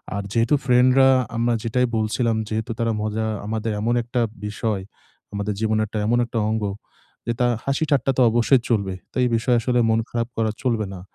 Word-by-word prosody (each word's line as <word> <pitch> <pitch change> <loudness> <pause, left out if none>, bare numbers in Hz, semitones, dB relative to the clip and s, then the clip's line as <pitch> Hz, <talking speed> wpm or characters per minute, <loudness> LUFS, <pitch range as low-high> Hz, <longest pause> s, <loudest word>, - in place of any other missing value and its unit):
আর 100 - -2
যেহেতু 115 +7 +2
ফ্রেন্ডরা 130 +1 +5 0.3
আমরা 120 +1 +1
যেটাই 125 +2 +1
বলছিলাম 110 +2 0
যেহেতু 110 +2 -3
তারা 115 -1 +1
মজা 110 +1 -2 0.2
আমাদের 110 +1 -2
এমন 115 +2 +1
একটা 120 +1 -1 0.2
বিষয় 105 -1 -2 0.5
আমাদের 100 +1 -2
জীবনের 110 -1 +1 0.2
এমন 120 +2 +3
একটা 115 -1 -3
অঙ্গ 110 0 -1 0.6
যে 120 - +1
তা 125 - +3 0.2
হাসি 140 +3 0
ঠাট্টা 135 -2 +2
তো - - +4
অবশ্যই 120 +3 +3
চলবে। 100 -5 0 0.2
তো - - -29
এই 125 - +2
বিষয় 120 +2 +2
আসলে 125 +1 +1
মন 110 0 +3
খারাপ 115 -1 -2
করা 110 -1 +1
চলবে 115 -5 0
না। 90 - -9
115 Hz, 185 wpm, -22 LUFS, 110-125 Hz, 0.6 s, ফ্রেন্ডরা